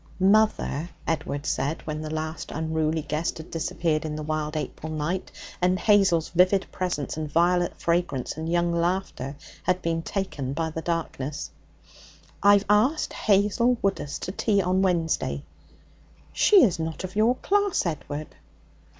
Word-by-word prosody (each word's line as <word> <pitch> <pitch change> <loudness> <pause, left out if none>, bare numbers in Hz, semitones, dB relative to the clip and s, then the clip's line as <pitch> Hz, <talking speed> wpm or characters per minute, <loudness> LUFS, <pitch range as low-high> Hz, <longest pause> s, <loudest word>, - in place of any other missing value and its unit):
'Mother,' 195 -5 +2 0.2
Edward 150 -2 -2
said, 150 +4 -1
when 155 -1 -4
the 155 - -5
last 155 0 -4
unruly 160 0 -1
guest 155 +4 -2
had 160 - -10
disappeared 165 -1 -1
in 155 -1 -4
the 155 - -4
wild 155 0 -2
April 155 +1 -5
night, 155 +4 -2 0.3
and 180 +1 +3
Hazel's 195 -7 +3
vivid 185 +2 +3
presence 155 -7 -3
and 155 -1 -4
violet 175 +2 +2
fragrance 170 -7 0
and 160 +2 -4
young 175 0 +2
laughter 170 -5 -1 0.3
had 180 0 +1
been 165 0 0
taken 165 -8 -3
by 160 +1 -2
the 160 - -4
darkness, 150 -4 -3 0.9
'I've 200 0 +5
asked 220 +10 +2
Hazel 210 +4 +2
Woodus 150 -8 -1
to 185 - -3
tea 200 +1 +1
on 185 0 +2
Wednesday.' 170 -4 0 0.9
'She 405 -4 +6
is 185 -8 +2
not 160 +2 -4
of 185 +1 -6
your 225 +4 +4
class, 405 - +1
Edward.' 150 -2 -4
170 Hz, 145 wpm, -26 LUFS, 155-190 Hz, 0.9 s, She